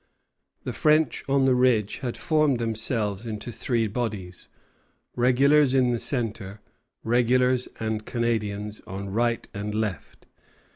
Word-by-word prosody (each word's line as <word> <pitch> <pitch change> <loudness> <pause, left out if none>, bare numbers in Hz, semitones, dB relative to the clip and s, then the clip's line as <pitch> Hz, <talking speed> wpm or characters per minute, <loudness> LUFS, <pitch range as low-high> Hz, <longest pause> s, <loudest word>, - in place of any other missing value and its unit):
The 125 - -4
French 150 +6 +2
on 135 -1 +3
the 130 - +4
ridge 125 -5 +2
had 125 -3 -4
formed 150 -5 +2
themselves 110 -2 -2
into 110 +2 -5
three 115 -1 -1
bodies, 105 -5 -4 0.7
regulars 135 +3 +4
in 125 -2 +3
the 120 - -1
centre, 110 -6 -3 0.4
regulars 125 +2 +2
and 110 -1 -2
Canadians 105 -3 -2
on 100 +1 -6
right 115 +2 0
and 105 +1 -4
left. 110 -4 -4
115 Hz, 125 wpm, -25 LUFS, 105-125 Hz, 0.7 s, the